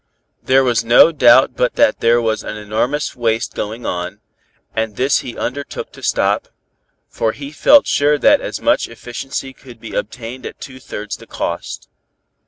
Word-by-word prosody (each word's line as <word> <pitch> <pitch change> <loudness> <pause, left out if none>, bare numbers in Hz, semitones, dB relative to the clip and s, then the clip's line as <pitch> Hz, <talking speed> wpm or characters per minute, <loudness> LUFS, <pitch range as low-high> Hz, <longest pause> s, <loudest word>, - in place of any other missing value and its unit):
There 135 +1 +3
was 120 -3 +1
no 120 +8 +6
doubt 125 -3 +5
but 125 - 0
that - - +3
there 115 +1 +3
was 110 -2 -1
an 105 - -6
enormous 110 +8 -2
waste 115 -2 -1
going 110 +3 -5
on, 90 +3 -4 0.6
and 110 -2 -2
this 130 +5 +2
he 125 - -8
undertook 140 +2 -5
to - - -14
stop, - - 0 0.6
for 110 -1 -1
he 140 0 -8
felt 285 - +5
sure 145 +1 +2
that 285 - +4
as - - -5
much 295 - +1
efficiency 130 +3 -6
could 125 -3 -15
be 115 - -9
obtained 120 +3 -5
at - - -11
two 130 -1 -10
thirds 105 -4 -6
the - - -15
cost. - - -5
120 Hz, 170 wpm, -18 LUFS, 110-135 Hz, 0.6 s, no